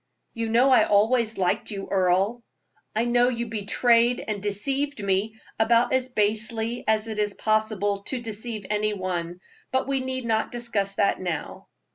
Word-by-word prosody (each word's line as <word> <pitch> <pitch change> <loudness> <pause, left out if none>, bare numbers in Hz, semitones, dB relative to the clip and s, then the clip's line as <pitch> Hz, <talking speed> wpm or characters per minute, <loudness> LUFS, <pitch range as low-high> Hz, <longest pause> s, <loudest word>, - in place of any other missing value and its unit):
"You 230 -1 -3
know 245 +4 +4
I 255 - +6
always 220 +2 +2
liked 190 +3 0
you, 195 -2 -5
Earle." 195 +5 +1 0.5
"I 225 +2 +1
know 240 +1 +3
you 235 -2 -3
betrayed 230 +3 +2
and 210 -2 -3
deceived 270 +8 0
me 200 +3 -1 0.2
about 235 +3 +3
as 260 0 +1
basely 220 +1 0
as 220 0 +1
it 215 -1 -4
is 205 -1 -1
possible 215 -2 0
to 260 - -2
deceive 220 -2 -3
any 210 0 0
one. 180 -2 -4 0.3
But 260 0 0
we 275 -1 0
need 260 -1 -4
not 220 -1 0
discuss 220 -5 -1
that 200 - +1
now." 170 -5 -5
220 Hz, 160 wpm, -25 LUFS, 205-240 Hz, 0.5 s, I